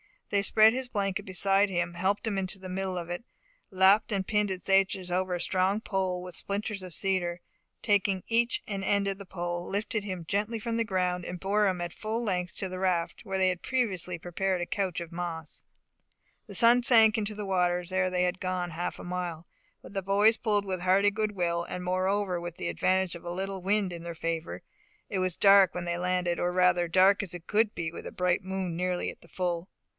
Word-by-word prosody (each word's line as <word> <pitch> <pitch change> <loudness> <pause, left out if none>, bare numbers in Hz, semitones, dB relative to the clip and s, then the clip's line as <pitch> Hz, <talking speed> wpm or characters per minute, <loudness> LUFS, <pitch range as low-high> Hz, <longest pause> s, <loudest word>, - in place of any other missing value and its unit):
They 200 - +3
spread 215 +2 +6
his 260 0 -1
blanket 200 -5 -2
beside 195 +2 +2
him, 175 -2 -1
helped 190 +5 0
him 210 -3 -1
into 190 +1 -2
the 185 -1 -9
middle 190 0 -3
of 170 -1 -5
it, 175 +7 -5 0.4
lapped 190 +4 +4
and 195 -1 0
pinned 210 0 +1
its 185 -1 -5
edges 190 -1 +2
over 185 0 0
a 175 - -3
strong 190 +3 +1
pole 185 -4 -2
with 180 -1 -8
splinters 200 0 -3
of 185 -2 -6
cedar, 185 -1 0
and 175 - -15 0.4
taking 200 -2 +2
each 235 +1 +1
an 195 -2 -4
end 200 +1 +1
of 195 - -3
the 200 - -8
pole, 175 -1 -4
lifted 210 +2 -2
him 185 -4 -5
gently 210 +5 -1
from 230 +1 -3
the 230 - +1
ground, 180 -3 0
and 180 0 -6
bore 205 +2 +2
him 185 -2 -1
at 175 -1 -4
full 220 +3 -3
length 180 -4 -2
to 190 - -2
the 185 0 -6
raft, 180 -3 -1
where 195 0 -2
they 190 -1 +3
had 180 -1 -3
previously 190 -9 -1
prepared 180 +2 -2
a - - -1
couch 185 -1 -2
of 170 0 -8
moss. 170 -2 -6 0.8
The 200 - -7
sun 235 +3 +6
sunk 225 -3 +6
into 215 -1 -2
the 210 0 -5
waters 180 -2 0
ere 185 0 +1
they 180 0 +1
had 180 +1 -1
gone 185 -1 -2
half 170 +2 -3
a - - -9
mile; 175 -2 -4 0.4
but - - -12
the 195 - -1
boys 205 +4 +4
pulled 205 -2 +1
with 185 -2 -3
a - - -5
hearty 195 +2 +4
good 215 0 -1
will, 170 -2 0
and 180 - -5
moreover 185 0 0
with 175 -1 -6
the 85 - -4
advantage 185 - +1
of 170 - -11
a - - -4
little 190 +1 -4
wind 195 0 +1
in 170 - -7
their 170 -1 -6
favour. 165 0 -4 0.5
It 195 - -2
was 185 -2 -1
dark 195 -2 +6
when 180 -1 -3
they 175 0 -2
landed, 180 -1 0
or 175 - 0
rather, 180 -1 +3
dark 190 +4 +4
as 185 -4 -6
it 175 -1 -9
could 215 0 +2
be 165 -1 -3
with - - -8
a - - -7
bright 180 +1 +1
moon 190 -2 -3
nearly 180 0 -1
at - - -18
the - - -17
full. 175 0 -3
185 Hz, 225 wpm, -28 LUFS, 175-200 Hz, 0.8 s, spread